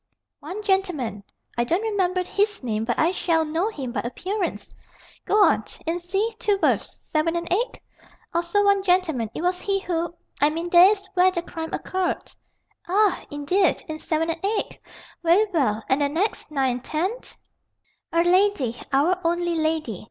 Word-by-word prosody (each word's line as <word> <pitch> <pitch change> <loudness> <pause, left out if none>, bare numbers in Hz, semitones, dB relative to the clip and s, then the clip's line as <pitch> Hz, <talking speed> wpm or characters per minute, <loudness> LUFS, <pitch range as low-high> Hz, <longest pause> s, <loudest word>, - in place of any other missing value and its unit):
"One 365 +8 -7
gentleman. 360 - 0 0.4
I - - +4
don't 340 - 0
remember 375 -4 0
his 410 -1 -1
name. 220 -2 -1
But 240 0 -1
I 325 +2 +3
shall 330 -3 +1
know 325 +7 0
him 270 - -5
by 235 - -2
appearance." 365 - -3 0.5
"Go 420 0 +4
on. - - +3 0.2
In 335 +2 -1
c, 390 +6 -1
two 410 -2 +2
berths, - - 0
7 325 +2 0
and 340 0 -2
8?" 460 +5 -1 0.5
"Also 345 +4 +1
one 400 -1 +4
gentleman. 355 - +1
It - - -4
was 360 0 0
he 395 -1 0
who 340 -2 -2 0.3
I 290 - +5
mean, 335 +3 -4
that 355 +1 +9
is 395 -2 -1
where 370 -1 +5
the 345 -2 -3
crime 325 -1 -6
occurred." 375 -1 -2 0.5
"Ah, 400 +2 +2
indeed, 315 +6 +1
in 315 0 -5
7 320 +1 0
and 330 +2 -7
8? 415 +2 -1 0.4
Very 350 +5 +4
well. 225 -9 +1
And 265 +2 +2
the 285 - +2
next, 350 +9 -1
9 270 -4 +1
and 245 +1 -5
10?" 320 +8 -1 1.0
"A 335 0 +3
lady. 350 - +2
Our 330 +7 +2
only 345 +1 0
lady. 315 - -1
345 Hz, 170 wpm, -24 LUFS, 305-385 Hz, 1.0 s, that